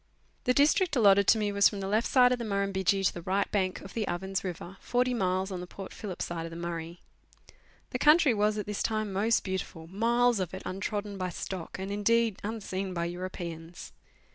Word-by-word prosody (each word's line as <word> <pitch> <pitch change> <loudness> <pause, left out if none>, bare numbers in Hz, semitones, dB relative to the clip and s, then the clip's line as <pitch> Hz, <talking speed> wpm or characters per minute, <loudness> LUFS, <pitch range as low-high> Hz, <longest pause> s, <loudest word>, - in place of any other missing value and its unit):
The 250 - +4
district 310 +4 +3
allotted 200 -4 +5
to 225 - +6
me 210 -1 0
was 200 0 +5
from 205 - -6
the 195 - -3
left 215 +4 +1
side 250 -1 +5
of 250 - 0
the - - -3
Mur 200 -2 0
rtimbidgee 195 0 +1
to - - +3
the 175 - -7
right 190 +3 +1
bank 190 -3 0
of 195 - -10
the 220 -3 -2
Ovens 190 +2 -2
River, 180 +1 -6
forty 250 +1 0
miles 190 -3 0
on 185 - -4
the 180 - -7
Port 195 +1 -9
Phillip 195 -5 -5
side 165 -1 -4
of - - -8
the 165 - -9
Murray. 170 0 -5 0.9
The - - -2
country 300 -3 +6
was 210 0 +1
at 210 - -3
this 210 -1 -3
time 215 -2 -1
most 215 +4 +2
beautiful 185 -4 -4
miles 235 +5 +2
of 185 -1 -3
it 190 - -8
untrodden 200 +1 -4
by 185 0 -1
stock, 180 0 -6
and, 190 +1 -5
indeed, 225 +1 +2
unseen 195 -3 -4
by 170 0 -1
Europeans. 170 -1 -6
195 Hz, 215 wpm, -29 LUFS, 185-220 Hz, 0.9 s, to